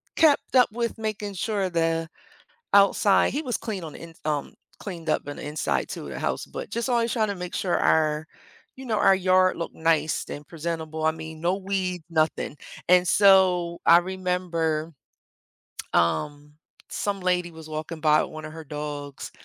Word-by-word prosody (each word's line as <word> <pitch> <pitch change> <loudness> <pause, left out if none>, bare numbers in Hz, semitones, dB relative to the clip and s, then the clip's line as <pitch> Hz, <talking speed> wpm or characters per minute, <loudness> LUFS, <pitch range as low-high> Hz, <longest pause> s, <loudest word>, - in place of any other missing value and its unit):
kept 300 -4 +3
up 250 -2 +6
with 235 +1 -2
making 215 -2 -4
sure 200 0 -1
the 165 -1 0 0.6
outside 200 0 +5
he 290 - -1
was 255 -6 -2
clean 215 -6 -5
on 155 -2 -7
the - - -10
ins 165 -1 -12
um, 150 -2 -2 0.3
cleaned 170 -5 -6
up - - +2
on 145 - -6
the - - -8
inside 150 +1 -1
to - - -6
the - - -6
house, - - -2
but - - -7
just 235 +2 -2
always 235 -2 +1
trying 220 -2 +1
to 200 - -2
make 180 -1 -6
sure 180 -3 0
our, 155 0 +2 0.5
you 265 - -10
know, 225 -3 0
our 195 - +5
yard 185 0 +3
looked 170 - -5
nice 160 -1 +1
and 145 0 -7
presentable. 160 -1 -4
I 160 - +4
mean, 160 0 -9
no 175 +2 +1
weeds, 185 -3 -2
nothing, 155 -2 0 0.3
and 180 0 +5
so, 185 -3 +4
I 170 - +8
remember, 175 -3 -2 1.0
um, 145 - 0 0.4
some 200 -1 -2
lady 180 -1 0
was 160 -1 -11
walking 155 +1 -5
by 155 -1 +4
with - - -7
one 155 0 -8
of 155 - -8
her 160 0 -8
dogs, 145 -1 -6
170 Hz, 180 wpm, -25 LUFS, 155-195 Hz, 1.0 s, I